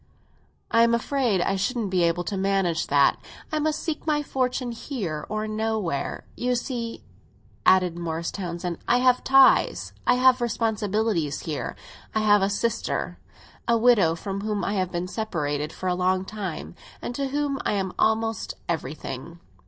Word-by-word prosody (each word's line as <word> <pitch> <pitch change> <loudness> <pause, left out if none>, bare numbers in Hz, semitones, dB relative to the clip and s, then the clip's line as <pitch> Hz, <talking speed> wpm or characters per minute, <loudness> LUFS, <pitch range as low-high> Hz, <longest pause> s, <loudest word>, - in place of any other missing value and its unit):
"I 230 - +5
am 235 0 +5
afraid 235 -5 +1
I 195 - +1
shouldn't 205 +1 -1
be 185 -1 +2
able 170 +1 +2
to 200 - -3
manage 190 -3 +1
that. - - +4 0.3
I 310 - 0
must 310 0 0
seek 320 -1 -4
my 295 -1 +2
fortune 255 -2 -1
here 205 - -4
or 215 0 -2
nowhere. 215 -8 -2
You 250 0 0
see," 235 -2 -4 0.6
added 180 -2 +4
Morris 165 -1 -3
Townsend, 175 -2 -4
"I 245 - +4
have 250 0 +3
ties—I 270 -2 +4
have 255 0 +5
responsibilities 215 -8 0
here. 155 -3 -4 0.4
I 220 - +2
have 205 -1 +5
a 195 - +2
sister, 230 +3 -2 0.5
a 235 0 +4
widow, 220 -9 +4
from 195 +3 -4
whom 210 -2 -2
I 200 - -1
have 185 -3 -1
been 175 0 -2
separated 150 -9 -2
for 185 - -5
a 180 - +2
long 185 +1 +1
time, 190 -7 -5 0.3
and - - -5
to 275 +2 -2
whom 280 0 -1
I - - 0
am 190 -2 -1
almost 225 -1 +1
everything. 155 0 -4
210 Hz, 160 wpm, -25 LUFS, 180-240 Hz, 0.6 s, I